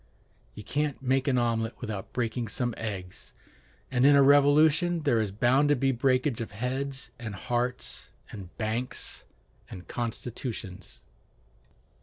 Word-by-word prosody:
"You 105 - -8
can't 145 +4 -1
make 135 +1 +1
an 130 -2 +3
omelet 115 -1 0
without 110 -5 -5
breaking 120 -1 -2
some 120 +3 -2
eggs," 95 -5 -7 0.6
and 125 -1 +2
in 145 +1 +7
a 140 - +7
revolution 150 +5 +5
there 120 -6 +3
is 105 -3 -2
bound 125 +7 +3
to 145 - +5
be 135 +1 +2
breakage 130 0 +1
of 110 -2 -6
heads 130 +4 -3
and 110 -4 -6
hearts, 120 +4 -3 0.2
and 95 -4 -8
banks 115 +3 -4 0.4
and 90 - -10
constitutions. 115 -4 -5
125 Hz, 135 wpm, -28 LUFS, 110-135 Hz, 0.6 s, in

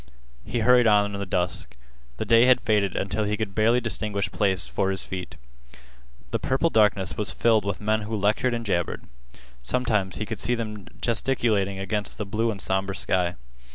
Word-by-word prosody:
He 115 - -2
hurried 125 0 +5
on 105 -1 +3
in 100 - -4
the 100 - -4
dusk. 90 -6 -2 0.4
The - - -3
day 115 +1 +5
had 130 - +6
faded 105 -3 +1
until 100 +3 -1
he 105 0 -1
could 110 -3 -3
barely 115 +4 +3
distinguish 105 -3 -2
place 95 -3 +1
for 95 - -1
his 95 0 -1
feet. 90 -9 -6 1.0
The - - 0
purple 135 +6 +1
darkness 105 -3 +2
was 105 0 -1
filled 110 -3 +2
with 100 -1 -2
men 110 +1 0
who 110 +1 -4
lectured 110 +4 +1
and 115 -1 -5
jabbered. 85 -5 -1 0.6
Sometimes 100 - 0
he 105 - -3
could 110 0 -5
see 125 - 0
them 105 -3 -6
gesticulating 110 -5 +1
against 100 +2 -2
the 105 - -3
blue 110 +4 -1
and 105 -3 -4
somber 95 0 0
sky. 90 -2 0
105 Hz, 185 wpm, -25 LUFS, 95-115 Hz, 1.0 s, had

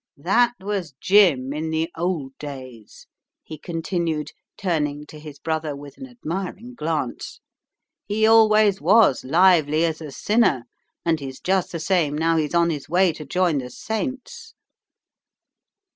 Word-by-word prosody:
That 235 +11 +2
was 190 -7 -4
Jim 165 -10 +4
in 155 +2 -3
the 160 +1 -1
old 160 -6 -3
days," 130 -6 -10 0.4
he 155 -2 -9
continued, 165 -2 -3 0.3
turning 150 -6 -2
to 150 +1 -12
his 150 -2 -10
brother 155 -1 -3
with 140 0 -11
an 265 - -8
admiring 210 0 -6
glance. 155 - -4 0.7
"He 215 +2 +1
always 215 -3 +5
was 195 - +4
lively 160 0 +4
as 160 -1 -3
a 155 - -7
sinner, 170 - +1 0.4
and 165 -2 +1
he's 135 -2 -8
just 190 0 0
the 170 - -4
same 160 -4 +1
now 165 +1 +2
he's 155 +1 -1
on 170 0 +3
his 145 -3 -6
way 180 0 +3
to 155 - -9
join 170 0 +1
the 125 -1 -6
saints." 265 - -5
165 Hz, 145 wpm, -23 LUFS, 150-195 Hz, 0.7 s, always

